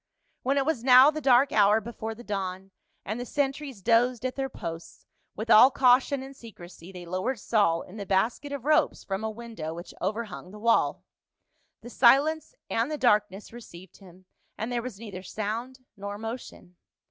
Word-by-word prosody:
When 275 +2 0
it 275 - +1
was 275 -7 -1
now 260 +3 +8
the 310 0 -5
dark 265 0 +4
hour 210 +1 +4
before 225 0 -7
the 240 - -12
dawn, 195 -2 -5 0.3
and 215 +4 -4
the - - -3
sentries 275 -6 -3
dozed 240 +2 +2
at 255 - -2
their 270 -1 -3
posts, 165 -5 -8 0.3
with 220 +3 -3
all 250 +5 +9
caution 265 +1 +3
and 270 +1 -11
secrecy 185 -7 -13
they 180 -2 -10
lowered 185 +9 -2
Saul 195 -6 +1
in 185 - -13
the 200 - -6
basket 225 +9 0
of 280 -3 -6
ropes 305 +1 +2
from 195 +2 -4
a 220 - -1
window 220 -8 -7
which 170 +1 -9
overhung 210 -1 -4
the 210 - -12
wall. 230 +2 +1 0.8
The 240 - -11
silence 300 - +3
and 230 +4 -1
the 305 - -3
darkness 210 -5 +1
received 190 -7 -13
him, 185 -1 -17 0.3
and 220 +3 -4
there 240 -1 -1
was 235 -5 -8
neither 205 -5 -8
sound 225 +7 -5
nor 200 0 -6
motion. 225 -5 -8
225 Hz, 180 wpm, -27 LUFS, 195-255 Hz, 0.8 s, all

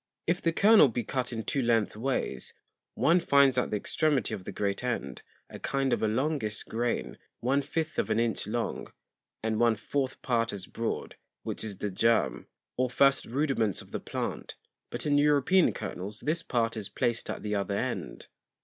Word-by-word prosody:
If 175 +2 +1
the 165 - +2
Kernel 205 -1 +7
be 120 -1 -2
cut 130 +3 -2
in 115 -2 -3
two 140 - -1
length 115 -4 +2
ways, 130 +5 -2 0.4
one 170 +3 +4
finds 140 -5 +4
at - - -1
the - - -1
Extremity 145 +3 0
of 90 - -6
the - - -5
great 100 +2 -2
end, 90 - -3 0.3
a - - -10
kind 135 -1 0
of - - 0
a 110 - +2
longish 115 -2 -1
[m]Grain, 120 +1 -2 0.2
one 135 +4 +2
fifth 160 +3 -3
of - - 0
an 110 - +2
Inch 115 -2 0
long, - - -2 0.6
and 110 -1 0
one 115 -1 +4
fourth 135 +1 -2
Part 115 -3 +1
as 100 -2 -5
broad, 115 0 -4 0.3
which - - -4
is 105 -3 -6
the 105 +1 -3
Germ, 95 - +1 0.3
or 130 0 +1
first 135 +2 +3
Rudiments 125 - 0
of - - -19
the - - -3
Plant; - - -4 0.3
but - - -4
in 145 -1 +3
European 150 +5 +4
Kernels 100 +4 -6
this 160 +3 -1
Part 115 -7 0
is 105 -3 -5
placed 115 +3 -1
at - - -4
the 105 0 -2
other 100 0 -1
end. - - -4
120 Hz, 185 wpm, -29 LUFS, 110-140 Hz, 0.6 s, Kernel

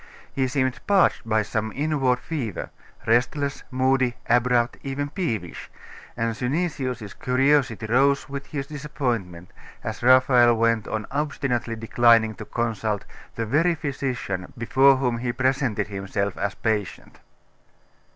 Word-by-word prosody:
He 130 -1 0
seemed 130 -1 -1
parched 195 - +3
by 110 -1 +2
some 110 +1 -3
inward 140 -4 +1
fever; 125 - -5 0.3
restless, 130 +5 +1
moody, 130 -1 +1
abrupt, 120 0 +2
even 145 +1 -3
peevish; 110 - -4 0.5
and 115 -1 -1
Synesius's 130 - -2
curiosity 130 -4 +1
rose 135 +5 +2
with 140 0 -6
his 140 -3 -4
disappointment, 120 - -4 0.3
as - - -5
Raphael 125 -1 +5
went 115 -1 +1
on 110 -1 -3
obstinately 140 -5 -2
declining 115 0 +3
to - - -9
consult 110 -3 -2 0.3
the 115 - -2
very 160 +9 +2
physician 130 - -4
before 135 +4 +4
whom 125 -3 -1
he 120 0 -1
presented 130 -4 0
himself 100 0 -3
as 100 +3 -2
patient. 110 -5 -3
125 Hz, 120 wpm, -24 LUFS, 110-140 Hz, 0.5 s, Raphael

